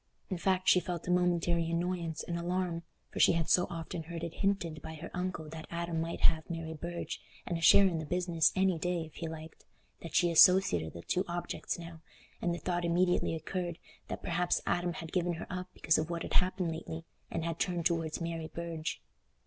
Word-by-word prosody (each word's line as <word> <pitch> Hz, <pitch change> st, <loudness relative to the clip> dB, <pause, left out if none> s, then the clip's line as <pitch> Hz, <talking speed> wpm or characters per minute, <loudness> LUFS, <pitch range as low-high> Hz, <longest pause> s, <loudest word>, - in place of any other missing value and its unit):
In 185 Hz, -, 0 dB
fact 185 Hz, 0 st, +1 dB
she 180 Hz, -, +7 dB
felt 175 Hz, -1 st, -4 dB
a -, -, +1 dB
momentary 175 Hz, -2 st, +2 dB
annoyance 170 Hz, -1 st, -1 dB
and 170 Hz, -, -3 dB
alarm, 175 Hz, 0 st, -1 dB, 0.3 s
for -, -, -5 dB
she -, -, +7 dB
had 165 Hz, -2 st, 0 dB
so 180 Hz, -, +4 dB
often 165 Hz, 0 st, -4 dB
heard 165 Hz, +1 st, -6 dB
it 170 Hz, -1 st, -4 dB
hinted 180 Hz, -6 st, 0 dB
by 160 Hz, -, -7 dB
her 160 Hz, +2 st, -8 dB
uncle 180 Hz, -3 st, -3 dB
that 160 Hz, 0 st, -8 dB
Adam 170 Hz, -1 st, -2 dB
might 165 Hz, +1 st, -4 dB
have 160 Hz, -1 st, +3 dB
Mary 165 Hz, -1 st, -4 dB
Burge 170 Hz, +2 st, -5 dB, 0.2 s
and 175 Hz, -, -2 dB
a 165 Hz, -, -3 dB
share 195 Hz, +4 st, +8 dB
in 170 Hz, -4 st, +1 dB
the 160 Hz, -, -4 dB
business 175 Hz, -2 st, +2 dB
any 185 Hz, -3 st, +2 dB
day, 175 Hz, -1 st, -1 dB
if 155 Hz, -, -14 dB
he 165 Hz, -, -3 dB
liked, 160 Hz, 0 st, -9 dB, 0.4 s
that 165 Hz, -, -7 dB
she 175 Hz, -2 st, +4 dB
associated 160 Hz, -, +6 dB
the 85 Hz, -, -8 dB
two 180 Hz, -, +1 dB
objects 175 Hz, 0 st, -3 dB
now, 170 Hz, -1 st, -9 dB, 0.4 s
and 175 Hz, -, +1 dB
the 170 Hz, -, -1 dB
thought 175 Hz, +2 st, -1 dB
immediately 175 Hz, 0 st, +2 dB
occurred 175 Hz, +1 st, -3 dB, 0.3 s
that -, -, -5 dB
perhaps 175 Hz, +1 st, +1 dB
Adam 175 Hz, 0 st, 0 dB
had 165 Hz, 0 st, -7 dB
given 175 Hz, -2 st, +1 dB
her 170 Hz, -, -5 dB
up 180 Hz, 0 st, -4 dB
because 155 Hz, -1 st, +2 dB
of 155 Hz, +1 st, -2 dB
what 170 Hz, -1 st, -2 dB
had -, -, -5 dB
happened 185 Hz, -2 st, +2 dB
lately, 160 Hz, 0 st, -6 dB, 0.2 s
and 165 Hz, -1 st, -2 dB
had 165 Hz, 0 st, -3 dB
turned 175 Hz, -2 st, 0 dB
towards 165 Hz, -2 st, +1 dB
Mary 165 Hz, -1 st, -3 dB
Burge. 170 Hz, -1 st, -4 dB
170 Hz, 210 wpm, -32 LUFS, 165-180 Hz, 0.4 s, share